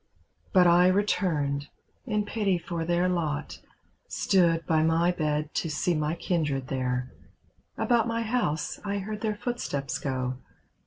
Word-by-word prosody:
But 185 Hz, -2 st, +6 dB
I 175 Hz, +1 st, +6 dB
returned, 160 Hz, -8 st, +1 dB, 0.4 s
in 210 Hz, -2 st, 0 dB
pity 205 Hz, -3 st, 0 dB
for 170 Hz, -1 st, -4 dB
their 175 Hz, +1 st, +2 dB
lot. 155 Hz, -5 st, -2 dB, 0.5 s
Stood 170 Hz, -3 st, +2 dB
by 160 Hz, -1 st, +2 dB
my 165 Hz, +2 st, +3 dB
bed 155 Hz, -2 st, -1 dB
to 165 Hz, -, -1 dB
see 155 Hz, +4 st, 0 dB
my 155 Hz, 0 st, 0 dB
kindred 150 Hz, -7 st, -1 dB
there; 125 Hz, -1 st, -1 dB, 0.7 s
About 235 Hz, -2 st, +2 dB
my 230 Hz, 0 st, -1 dB
house 215 Hz, -10 st, -1 dB
I 200 Hz, 0 st, -2 dB
heard 210 Hz, +2 st, -5 dB
their 215 Hz, -2 st, -1 dB
footsteps 205 Hz, -, -3 dB
go. 130 Hz, -2 st, -2 dB
170 Hz, 140 wpm, -27 LUFS, 150-200 Hz, 0.7 s, But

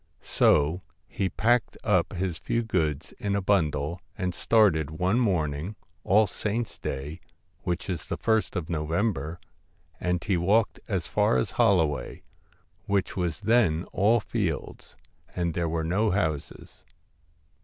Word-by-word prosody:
So 80 Hz, +5 st, +3 dB, 0.3 s
he 95 Hz, -2 st, -2 dB
packed 120 Hz, +3 st, +1 dB
up 90 Hz, -5 st, +2 dB
his 90 Hz, -3 st, -2 dB
few 115 Hz, 0 st, -1 dB
goods 80 Hz, -8 st, -1 dB
in 100 Hz, -1 st, -1 dB
a -, -, +2 dB
bundle, 85 Hz, -4 st, 0 dB, 0.2 s
and 90 Hz, -3 st, -2 dB
started 90 Hz, -8 st, +3 dB
one 90 Hz, +8 st, +1 dB
morning, 85 Hz, -, 0 dB, 0.3 s
All 105 Hz, +3 st, +4 dB
Saints' 105 Hz, +3 st, -3 dB
Day, 70 Hz, +4 st, -5 dB, 0.4 s
which 85 Hz, -1 st, -3 dB
is 90 Hz, -5 st, -4 dB
the -, -, -3 dB
ist 110 Hz, -2 st, +1 dB
of 85 Hz, -4 st, -2 dB
November, 80 Hz, 0 st, -1 dB, 0.6 s
and 90 Hz, -2 st, -1 dB
he 95 Hz, -3 st, +1 dB
walked 100 Hz, +5 st, +2 dB
as -, -, -1 dB
far -, -, +2 dB
as 60 Hz, -, -1 dB
Holloway; 80 Hz, -, +1 dB, 0.6 s
which 100 Hz, -1 st, 0 dB
was 85 Hz, -5 st, -2 dB
then 105 Hz, -9 st, +3 dB
all 110 Hz, +4 st, +4 dB
fields, 100 Hz, -7 st, -4 dB, 0.4 s
and 85 Hz, -2 st, -1 dB
there 85 Hz, -1 st, -1 dB
were 80 Hz, 0 st, -1 dB
no 100 Hz, +7 st, +1 dB
houses. 80 Hz, -7 st, -3 dB
90 Hz, 135 wpm, -27 LUFS, 80-105 Hz, 0.6 s, All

